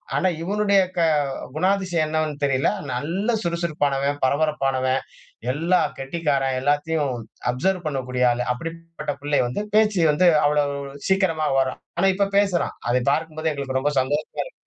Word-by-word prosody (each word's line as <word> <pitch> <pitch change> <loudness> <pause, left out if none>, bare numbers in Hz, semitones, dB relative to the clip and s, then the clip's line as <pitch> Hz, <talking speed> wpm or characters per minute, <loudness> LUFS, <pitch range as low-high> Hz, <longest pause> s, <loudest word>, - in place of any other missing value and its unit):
ஆனா, 190 - +2 0.2
இவனுடைய 200 +1 +2 0.2
க 170 - +3 0.5
குணாதிசயம் 185 -2 +1
என்னவென்னு 155 -2 -2
தெரியல. 135 -1 +2 0.2
நல்ல 185 - -1
சுறுசுறுப்பானவன், 145 -5 -1
பரபரப்பானவன், 135 -2 +1 0.5
எல்லா 170 +6 +2 0.2
கெட்டிக்காரன், 135 -2 -1
எல்லாத்தையும் 145 0 0 0.4
அப்சர்வ் 175 +7 -1
பண்ணக்கூடிய 130 -3 -2
ஆளு. 120 +1 -1
அப்பிடிப்பட்ட 165 +1 -6
பிள்ளை 145 0 +1
வந்து 125 - -3
பேச்சு 210 -4 +4
வந்து 180 +5 +3 0.2
அவ்வளவு 145 -1 +1 0.3
சீக்கிரமா 180 -6 +2
வரும். 130 -1 -1 0.2
ஆனா, 195 +2 +4
இப்ப 200 0 +1
பேசுறான். 195 -4 +1
அதை 125 +1 +2
பார்க்கும்போது 160 +1 -1
எங்களுக்கு 135 -2 -2
ரொம்ப 145 +2 0
சந்தோஷமாக 145 +4 -1
இருக்கு - - -12
155 Hz, 130 wpm, -23 LUFS, 135-175 Hz, 0.5 s, பேச்சு